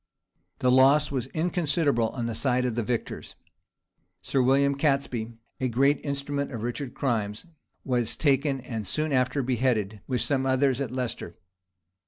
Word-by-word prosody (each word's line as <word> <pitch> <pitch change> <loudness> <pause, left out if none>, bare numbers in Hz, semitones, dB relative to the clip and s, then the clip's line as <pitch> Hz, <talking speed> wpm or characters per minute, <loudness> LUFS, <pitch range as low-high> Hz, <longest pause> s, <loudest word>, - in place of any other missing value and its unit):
The 125 - +2
loss 140 +3 +5
was 130 -3 -2
inconsiderable 155 -6 0
on 120 -3 -4
the 115 - -2
side 125 +2 +1
of 125 - 0
the 120 - -1
victors. 115 +1 -4 0.9
Sir 135 - +1
William 140 +2 +3
Catesby, 135 -6 0 0.3
a 130 - 0
great 135 +4 +2
instrument 140 0 -2
of 115 -4 -5
Richard's 120 +2 -4
crimes, 110 - -1 0.4
was 120 -4 0
taken, 140 -2 +1
and 115 -5 -5
soon 155 - 0
after 130 +2 +1
beheaded, 115 -5 0
with 125 -3 -1
some 135 +2 0
others, 130 0 +2
at 135 - -2
Leicester. 120 -8 -4
130 Hz, 150 wpm, -27 LUFS, 120-140 Hz, 0.9 s, loss